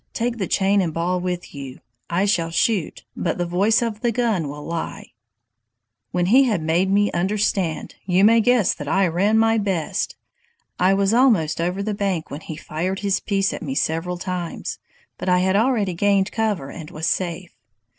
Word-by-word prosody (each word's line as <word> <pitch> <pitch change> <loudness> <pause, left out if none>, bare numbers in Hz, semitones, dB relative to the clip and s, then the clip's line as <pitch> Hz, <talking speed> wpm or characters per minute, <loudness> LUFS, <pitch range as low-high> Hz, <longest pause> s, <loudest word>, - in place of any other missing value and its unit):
take 235 0 -2
the 190 - -1
chain 195 +1 +2
and 165 -4 -2
ball 175 +2 0
with 180 0 -4
you. 135 -3 -8 0.3
I 175 +3 +1
shall 170 -5 +1
shoot, 185 +1 0
but - - -2
the 175 - -1
voice 200 +7 +2
of 220 -2 -4
the 240 - +1
gun 220 -9 0
will 145 +1 -8
lie.' 165 0 -5 1.0
"When 180 -1 0
he 255 +8 +5
had 210 -10 0
made 170 +4 +1
me 205 +1 +3
understand, 190 -2 -1
you 185 +1 +3
may 230 +1 +6
guess 245 -3 +3
that 145 - -8
I 195 +5 +3
ran 190 +6 +2
my 225 0 +3
best! 190 -6 -2 0.6
I 185 +1 +4
was 195 +1 +2
almost 215 - +3
over 180 +4 -1
the 215 +1 -2
bank 195 -5 -2
when 145 - -6
he 160 - -7
fired 175 +6 -3
his 200 -2 +1
piece 195 -1 0
at - - -6
me 135 -4 -4
several 165 +4 -1
times, 180 -1 -4 0.4
but 185 - -2
I 180 - +4
had 190 +1 +2
already 215 -4 +2
gained 200 +2 +2
cover 210 -11 -1
and 160 -2 -9
was 155 +1 -5
safe. 175 0 -2
190 Hz, 185 wpm, -22 LUFS, 170-210 Hz, 1.0 s, may